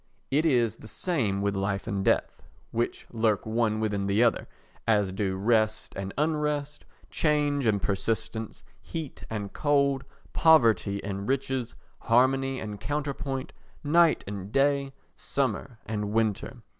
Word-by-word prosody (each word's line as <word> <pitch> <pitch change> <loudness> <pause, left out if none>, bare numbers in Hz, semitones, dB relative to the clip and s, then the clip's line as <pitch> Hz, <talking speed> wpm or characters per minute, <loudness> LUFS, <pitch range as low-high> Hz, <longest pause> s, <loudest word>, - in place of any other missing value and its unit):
It 150 +4 +3
is 120 -6 +2
the - - -12
same 110 - -1
with 100 0 0
life 100 0 -1
and 100 -3 -2
death, - - +1 0.3
which 115 +1 -2
lurk 110 -3 +1
one 110 -1 +1
within 105 -2 -1
the 100 +4 +3
other 120 - +2 0.4
as 105 -4 +3
do 95 0 -1
rest 110 +2 +1
and 95 0 -4
unrest, 150 -1 -1 0.3
change 145 -4 +1
and 105 -2 +3
persistence, 110 +3 -2 0.2
heat 160 -4 -6
and 105 -3 -4
cold, 140 -2 +2 0.3
poverty 115 -10 +4
and 100 0 -4
riches, 130 -3 -1 0.2
harmony 130 +2 +2
and 105 -2 -6
counterpoint, 140 +1 -3 0.3
night 165 +2 +4
and 100 0 -6
day, 140 +1 +2 0.2
summer 130 -2 -2
and 105 -1 -2
winter. 110 -2 -1
115 Hz, 130 wpm, -27 LUFS, 105-140 Hz, 0.4 s, poverty